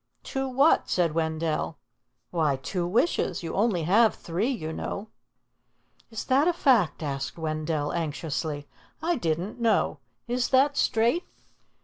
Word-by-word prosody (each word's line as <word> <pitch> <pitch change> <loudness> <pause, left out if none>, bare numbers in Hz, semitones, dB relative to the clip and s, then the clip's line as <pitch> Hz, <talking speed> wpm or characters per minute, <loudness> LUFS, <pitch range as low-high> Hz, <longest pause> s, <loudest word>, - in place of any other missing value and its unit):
"Two 270 0 -3
what?" 275 +5 +3
said 170 -4 +1
Wendell. 160 -1 -1 0.5
"Why, 155 -5 +2
two 175 +6 -3
wishes. 220 - +1
You 165 - -4
only 200 -5 +1
have 215 +7 +4
three, 180 +9 -2
you 160 -12 -3
know." 200 +6 -5 1.0
"Is 225 -1 -5
that 275 +5 +3
a 355 - +3
fact?" 235 - +2
asked 135 -2 -3
Wendell 155 -2 -2
anxiously. 155 -2 -3 0.4
"I 345 +1 +2
didn't 180 - -2
know. 230 -2 +2 0.3
Is 245 +1 0
that 275 +2 +4
straight?" 235 +11 +2
180 Hz, 130 wpm, -27 LUFS, 160-245 Hz, 1.0 s, have